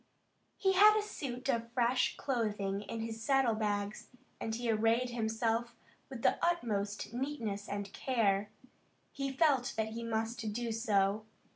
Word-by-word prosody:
He 385 -1 +2
had 420 +3 +7
a 425 - +1
suit 255 -10 -5
of 235 -3 0
fresh 245 +1 +2
clothing 210 -6 -1
in 225 +2 -5
his 225 0 -5
saddle 270 -2 +3
bags, 205 -1 -2 0.3
and 220 0 -2
he 240 +1 -3
arrayed 225 +3 +2
himself 230 0 -1 0.3
with 260 -4 -7
the - - +2
utmost 215 -12 -1
neatness 235 -6 -3
and 200 0 -4
care. 210 -6 +1 0.6
He 275 -1 -3
felt 270 -3 +2
that 220 0 0
he 230 +1 -5
must 225 -1 -2
do 235 +1 -2
so. 215 -2 +1
230 Hz, 145 wpm, -33 LUFS, 215-255 Hz, 0.6 s, had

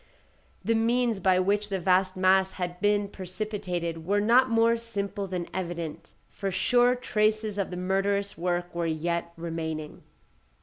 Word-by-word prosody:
The 230 - +3
means 230 -1 +1
by 185 -1 +3
which 205 +2 +1
the 195 - -1
vast 185 +1 +2
mass 190 0 +3
had 180 -1 -4
been 205 0 +2
precipitated 185 -4 -4
were 200 +5 +1
not 240 +5 +4
more 230 0 +4
simple 205 -3 -4
than 180 -2 -4
evident, 170 -4 -5
for 195 - -4
sure 245 +6 +3
traces 215 -3 0
of 195 - -1
the 180 - -5
murderous 195 +2 0
work 175 0 -2
were 170 -1 -1
yet 170 +2 -2
remaining. 160 -2 -5
190 Hz, 145 wpm, -27 LUFS, 175-210 Hz, -, not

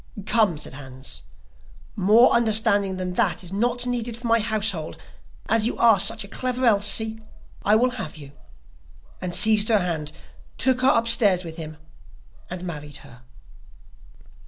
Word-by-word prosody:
'Come,' 215 -7 +2
said 150 - -8
Hans, 130 -1 -9 0.7
'more 215 +5 +4
understanding 215 -4 +2
than 180 -1 -4
that 180 - 0
is 180 +1 -8
not 240 +4 -1
needed 240 -2 -3
for 240 - -11
my 230 0 +3
household, 210 -7 -2 0.5
as 225 0 +2
you - - -4
are 225 -4 +4
such 220 +3 0
a - - -11
clever 255 +4 -2
Elsie, 220 +1 +2 0.4
I 210 - +3
will 250 +3 +2
have 190 -11 -7
you,' 140 -2 -12 0.9
and 180 -1 -3
seized 215 0 +5
her 220 - +4
hand, 165 -6 -3 0.5
took 255 -1 0
her 260 - +4
upstairs 230 -6 +3
with 165 -1 -9
him, 155 -2 -8 0.7
and 180 0 -7
married 150 -5 -7
her. 125 0 -16
210 Hz, 150 wpm, -23 LUFS, 175-230 Hz, 0.9 s, seized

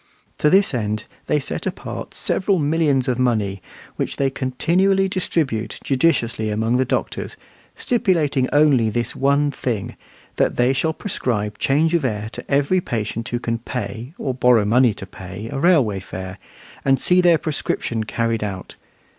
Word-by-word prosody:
To 150 - +4
this 195 +1 +4
end 110 -3 -2 0.2
they 150 - +2
set 135 - -4
apart - - -6
several 195 0 +1
millions 145 -4 +1
of 125 -1 0
money, 105 -6 0 0.4
which - - -2
they 135 -1 +1
continually 180 +10 +1
distribute 155 - -1
judiciously 125 -6 +1
among 110 +3 +1
the 130 - +2
doctors, - - -3 0.4
stipulating 165 - +1
only 145 -6 +4
this 120 +2 -2
one 140 +1 +2
thing, 120 -6 -3 0.4
that - - +2
they 125 +2 +3
shall 160 +4 0
prescribe 105 - -2
change 155 +4 +2
of 170 -3 +2
air 110 -4 -2
to - - -9
every 145 +7 +2
patient 115 -2 -3
who 120 - -1
can 115 -1 -2
pay, 120 - -6
or 130 - -2
borrow 125 -4 +4
money 120 0 +4
to - - -7
pay, 95 +2 -8
a - - -3
railway 140 - +3
fare, 95 0 -7 0.4
and 135 -1 +3
see 180 0 +4
their 175 -2 +5
prescription 130 -7 -2
carried 115 0 -1
out. 95 -3 -5
130 Hz, 155 wpm, -21 LUFS, 110-150 Hz, 0.4 s, their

